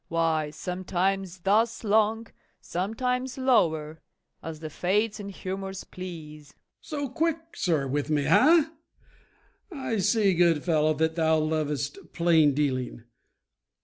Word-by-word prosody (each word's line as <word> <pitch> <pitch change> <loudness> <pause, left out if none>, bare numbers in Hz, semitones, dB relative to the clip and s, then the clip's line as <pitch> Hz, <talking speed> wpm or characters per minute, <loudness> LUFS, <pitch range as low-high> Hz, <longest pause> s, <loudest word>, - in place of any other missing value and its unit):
why, 160 -2 0
sometimes 185 +2 -2
thus 225 +5 +2
long, 220 +1 +2 0.3
sometimes 250 +7 -2
lower, 160 -12 +1 0.4
as 160 -1 -7
the 160 - -6
Fates 205 +6 0
and 200 -1 -6
humors 190 0 -5
please. 155 -5 -9
MORE. - - -42 0.5
So - - -6
quick, 325 +5 0 0.2
sir, 155 -6 0
with 145 +2 -2
me, 150 -2 +1
ha? 310 - +5 1.0
I 265 - -3
see, 200 0 +3
good 170 -3 +3
fellow, 155 -2 +2
Thou 160 +1 +2
lovest 150 -3 -1
plain 160 -4 +4
dealing. 130 -5 -1
175 Hz, 115 wpm, -27 LUFS, 155-215 Hz, 1.0 s, ha